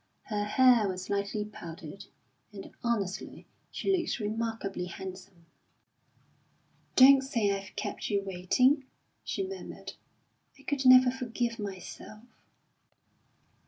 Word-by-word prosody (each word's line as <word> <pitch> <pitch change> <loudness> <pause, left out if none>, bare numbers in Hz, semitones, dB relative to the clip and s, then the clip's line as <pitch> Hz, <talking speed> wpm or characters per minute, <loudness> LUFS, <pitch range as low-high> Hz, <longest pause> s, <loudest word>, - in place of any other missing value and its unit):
Her 205 -1 -2
hair 240 -1 +5
was 185 0 -5
lightly 200 +1 -1
powdered, 170 -2 -9 0.5
and 200 -2 -10
honestly 210 -6 -3 0.2
she 390 - 0
looked 345 - -2
remarkably 215 -3 -3
handsome. 185 -1 -9 1.5
"Don't 270 +1 +8
say 230 -7 0
I've 195 0 -5
kept 205 0 -4
you 200 -1 0
waiting," 250 +10 +2 0.4
she 390 - -2
murmured. 390 0 -8 0.6
"I 275 - -18
could 280 -2 0
never 255 0 +8
forgive 240 -2 -3
myself." 205 +2 -8
210 Hz, 105 wpm, -29 LUFS, 195-255 Hz, 1.5 s, Don't